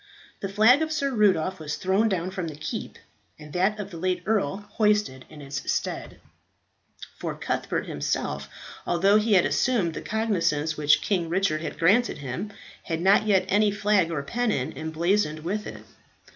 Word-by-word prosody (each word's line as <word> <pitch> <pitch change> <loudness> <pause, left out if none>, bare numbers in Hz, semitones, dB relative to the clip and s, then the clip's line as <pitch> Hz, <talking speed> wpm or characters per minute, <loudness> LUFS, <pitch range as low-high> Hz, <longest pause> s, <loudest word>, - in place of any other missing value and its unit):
The 195 - -4
flag 220 +8 +5
of 315 0 -1
Sir 280 -3 0
Rudolph 190 -6 +2
was 150 -1 -4
thrown 195 +4 +1
down 185 -2 -2
from 185 -3 -4
the 155 - -7
keep, 150 +1 -6 0.4
and 150 -1 -12
that 195 +4 +1
of 200 -1 -6
the 170 - -8
late 180 +1 -1
earl 205 -2 0
hoisted 210 - +1
in 150 -2 -11
its 140 -1 -3
stead; - - -3 1.0
for - - -4
Cuthbert - - -2
himself, 70 0 -3 0.4
although 195 +4 +4
he 215 0 +2
had 185 -3 +5
assumed 210 -10 +1
the - - -5
cognizance 170 -9 0
which 150 0 +3
King 175 -5 0
Richard 170 -3 0
had 165 - -5
granted 205 +9 +3
him, 140 +10 -5 0.3
had 165 -2 -2
not 195 +4 +4
yet 195 -3 +3
any 210 +2 +3
flag 205 -3 +2
or 155 -4 -3
pennon 220 - -1
emblazoned 160 +1 0
with 205 +6 -3
it. - - -9
185 Hz, 170 wpm, -25 LUFS, 160-210 Hz, 1.0 s, flag